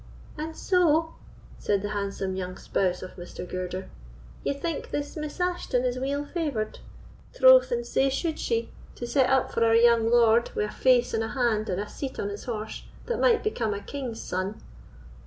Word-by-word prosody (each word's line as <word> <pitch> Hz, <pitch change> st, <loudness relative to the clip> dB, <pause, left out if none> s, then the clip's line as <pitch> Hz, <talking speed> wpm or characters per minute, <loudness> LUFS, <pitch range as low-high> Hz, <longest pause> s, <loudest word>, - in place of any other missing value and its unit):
"And 320 Hz, +1 st, -5 dB
so," 325 Hz, -3 st, +2 dB, 0.5 s
said 200 Hz, -1 st, 0 dB
the 205 Hz, -, -2 dB
handsome 200 Hz, -2 st, -3 dB
young 185 Hz, -1 st, -4 dB
spouse 180 Hz, -2 st, -1 dB
of 185 Hz, -, -9 dB
Mr. 180 Hz, 0 st, -8 dB
Girder, 185 Hz, +1 st, -4 dB, 0.6 s
"ye -, -, 0 dB
think 290 Hz, +3 st, -4 dB
this 290 Hz, 0 st, -3 dB
Miss 305 Hz, +1 st, -5 dB
Ashton 355 Hz, -8 st, 0 dB
is 250 Hz, 0 st, -1 dB
weel 280 Hz, +2 st, -1 dB
favoured? 285 Hz, -10 st, -3 dB, 0.6 s
Troth, -, -, +7 dB
and 480 Hz, 0 st, -1 dB
sae 270 Hz, -, +2 dB
should 315 Hz, +4 st, -2 dB
she, 230 Hz, -1 st, -1 dB, 0.2 s
to 240 Hz, -, -5 dB
set 255 Hz, +1 st, +2 dB
up 265 Hz, -1 st, +2 dB
for -, -, +1 dB
our 225 Hz, 0 st, +4 dB
young 230 Hz, -1 st, +5 dB
lord, 235 Hz, -1 st, +4 dB
with 210 Hz, 0 st, -1 dB
a -, -, -13 dB
face 250 Hz, -2 st, +3 dB
and 225 Hz, 0 st, +1 dB
a -, -, -2 dB
hand, 225 Hz, -4 st, 0 dB
and 185 Hz, 0 st, -1 dB
a 205 Hz, -, -3 dB
seat 270 Hz, +4 st, -6 dB
on 200 Hz, -, -1 dB
his 205 Hz, 0 st, -7 dB
horse, 215 Hz, -3 st, -4 dB, 0.2 s
that 480 Hz, -, -2 dB
might 475 Hz, -2 st, +4 dB
become 230 Hz, -, -1 dB
a -, -, -4 dB
king's 255 Hz, 0 st, -6 dB
son. 185 Hz, +3 st, -3 dB
240 Hz, 190 wpm, -27 LUFS, 210-290 Hz, 0.6 s, Troth